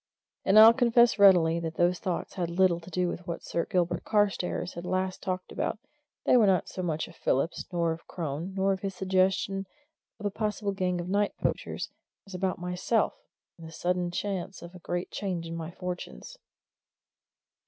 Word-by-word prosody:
And 195 - +5
I'll 220 +1 +10
confess 235 -2 +4
readily 175 -4 +6
that 165 -1 -4
those 175 +1 +2
thoughts 180 -2 -3
had 175 -3 -2
little 175 0 +3
to 170 - -12
do 180 +1 0
with 175 +1 -5
what 170 -1 -4
Sir 170 - -2
Gilbert 175 -2 0
Carstairs 200 -4 0
had 170 - -7
last 185 +1 -2
talked 185 -1 -4
about - - -2 0.5
they - - +5
were 220 -4 +5
not 185 -3 +2
so 185 - -5
much 160 -3 -2
of - - -15
Phillips, 140 +6 0
nor 170 -2 +1
of 160 +1 -7
Crone, 165 +3 -4
nor 195 0 +2
of 190 - -4
his 195 0 -4
suggestion 190 +1 +1 0.5
of 210 - -7
a 205 - 0
possible 210 -1 -2
gang 185 -2 -1
of 175 - -4
night 200 +2 +1
poachers, - - -3 0.3
as 195 - -12
about 185 +1 -1
myself 180 +5 0 0.5
and 165 - -9
this 160 - -11
sudden 180 0 0
chance 190 0 -4
of 170 +1 -10
a 180 - -11
great 175 +1 -4
change 180 -4 -3
in 165 0 -5
my 165 -1 -5
fortunes. 175 - -7
180 Hz, 185 wpm, -28 LUFS, 170-195 Hz, 0.5 s, I'll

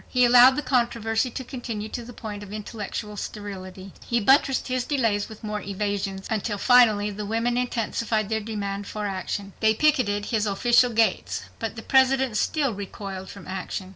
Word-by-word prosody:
He 250 -1 +3
allowed 250 +2 +8
the 295 - -2
controversy 235 -2 +1
to 260 +2 -6
continue 235 -4 -5
to 240 - -5
the 240 - -10
point 210 -3 -7
of 205 -1 -10
intellectual 210 0 -5
sterility. 195 -2 -7
He 235 - 0
buttressed 270 +3 +3
his 255 -1 -1
delays 230 -8 0
with 220 0 -12
more 210 -1 -3
evasions, 200 -1 -3
until 215 -1 -2
finally 215 -3 +5
the 205 +1 -5
women 230 +3 0
intensified 230 -3 -1
their 220 +1 0
demand 205 -2 -4
for 210 -1 -4
action. 195 0 -4
They 220 0 +3
picketed 220 -7 +2
his 215 -2 0
official 240 +5 +4
gates. 225 0 +1 0.2
But 225 -1 -4
the 225 - -8
President 265 -2 +3
still 275 +3 +1
recoiled 195 -1 -7
from 200 - -11
action. 185 0 -5
215 Hz, 170 wpm, -25 LUFS, 205-245 Hz, 0.2 s, allowed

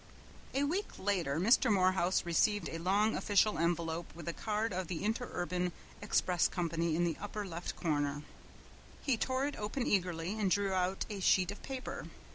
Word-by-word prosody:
A 275 - +2
week 360 +8 -2
later 175 -7 0
Mr. 230 +5 +4
Morehouse 185 -2 +3
received 185 +2 +2
a 165 - -5
long 200 +5 +2
official 205 -2 +2
envelope 170 0 0
with 170 -2 -9
the 170 - -2
card 215 +1 -1
of 185 -1 -2
the 170 -1 -4
Interurban 180 -5 -1 0.3
Express 180 -4 +2
Company 170 -2 -1
in 175 - +2
the 170 -2 0
upper 205 0 -4
left 170 -1 -5
corner. 145 -2 -1 0.8
He 275 - +2
tore 260 +4 0
it 290 - -3
open 215 +5 -2
eagerly 180 +1 0
and 200 -3 +2
drew 200 0 +1
out 185 +1 0
a 205 - -4
sheet 185 0 +3
of 200 - -9
paper. 265 -1 -5
185 Hz, 170 wpm, -33 LUFS, 170-210 Hz, 0.8 s, Mr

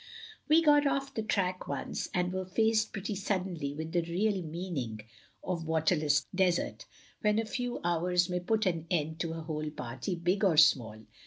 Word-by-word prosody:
".... 440 -1 -18
We 320 +2 +6
got 295 -2 +5
off 275 0 -1
the 220 - -2
track 185 -4 -1
once, - - -3
and 180 0 0
were 185 0 -2
faced 220 +3 +2
pretty 205 0 -4
suddenly 185 -7 -2
with 160 +1 -5
the 175 0 +2
real 190 +4 0
meaning 155 -10 -4 0.4
of 170 -3 -3
water 160 +2 +2
less 150 -1 +2
desert; 185 -2 0 0.3
when 210 0 +2
a 225 - +1
few 245 +3 -3
hours 175 +1 +2
may 180 -1 -1
put 215 +5 0
an 170 -3 -1
end 160 -3 -1
to 165 -1 -2
a 165 - -5
whole 155 -1 -3
party, 125 +2 -4
big 175 +4 0
or 180 -6 +3
small. 110 -8 +4
180 Hz, 185 wpm, -31 LUFS, 160-205 Hz, 0.4 s, We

